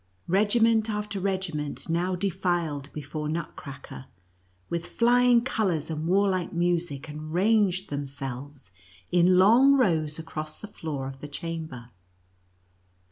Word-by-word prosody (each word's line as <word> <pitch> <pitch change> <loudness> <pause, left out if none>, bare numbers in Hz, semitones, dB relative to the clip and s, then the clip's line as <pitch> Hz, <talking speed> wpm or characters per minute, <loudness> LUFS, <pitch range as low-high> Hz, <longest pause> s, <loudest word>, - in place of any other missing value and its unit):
Regiment 220 +4 +3
after 210 -1 -3
regiment 185 -6 -2
now 175 +3 0
defiled 170 -6 -1
before 150 +1 -5
Nutcracker, 145 -4 -6 0.6
with 170 0 -3
fiying 245 0 +4
colors 175 - 0
and 155 +1 -3
warlike 185 -1 +2
music, 170 -4 -1
and 155 +1 -7
ranged 195 0 +2
themselves 135 -4 -6 0.4
in 180 +1 +5
long 235 +9 +7
rows 160 - +2
across 155 -1 -6
the - - -9
floor 150 -9 -5
of 135 0 -8
the 145 - -7
chamber. 150 -6 -6
170 Hz, 115 wpm, -27 LUFS, 150-200 Hz, 0.6 s, long